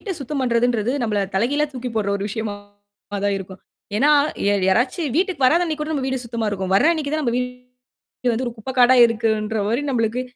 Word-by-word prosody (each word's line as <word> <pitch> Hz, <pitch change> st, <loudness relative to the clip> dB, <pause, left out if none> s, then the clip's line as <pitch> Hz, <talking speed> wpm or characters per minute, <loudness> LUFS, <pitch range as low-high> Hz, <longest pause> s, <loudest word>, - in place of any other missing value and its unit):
வீட்ட 400 Hz, -, -4 dB
சுத்தம் 280 Hz, +1 st, -3 dB
பண்றதுன்றது 240 Hz, -1 st, +1 dB
நம்பள 215 Hz, -3 st, 0 dB, 0.2 s
தலைகீழா 260 Hz, +9 st, +1 dB
தூக்கி 250 Hz, -1 st, -5 dB
போடுற 210 Hz, -2 st, 0 dB
ஒரு 200 Hz, -, -5 dB
விஷயமா 215 Hz, -1 st, -4 dB, 0.7 s
தான் 200 Hz, 0 st, +1 dB
இருக்கும். 190 Hz, 0 st, -10 dB, 0.4 s
ஏன்னா 285 Hz, +6 st, +4 dB, 0.4 s
ய 205 Hz, -, +4 dB, 0.2 s
யாராச்சு 250 Hz, -, +1 dB
வீட்டுக்கு 360 Hz, -6 st, +1 dB
வராத 335 Hz, +7 st, +4 dB
அன்னைக்கு 310 Hz, -3 st, -3 dB
கூட 305 Hz, -, -4 dB
நம்ப 280 Hz, -4 st, -2 dB
வீடு 265 Hz, 0 st, -1 dB
சுத்தமா 230 Hz, -1 st, -3 dB
இருக்கும். 190 Hz, -2 st, -3 dB
வர்ற 200 Hz, -, +4 dB
அன்னைக்கு 305 Hz, -4 st, -3 dB
தான் 310 Hz, 0 st, 0 dB
நம்ப 240 Hz, -4 st, 0 dB
வீடு 250 Hz, 0 st, -6 dB
வந்து 235 Hz, +3 st, -1 dB
ஒரு 240 Hz, -, -3 dB
குப்பைக்காடா 250 Hz, +2 st, +3 dB
இருக்குன்ற 220 Hz, -1 st, -1 dB
மாதிரி 235 Hz, +6 st, 0 dB
நம்பளுக்கு 230 Hz, -1 st, 0 dB
245 Hz, 190 wpm, -21 LUFS, 220-270 Hz, 0.7 s, ஏன்னா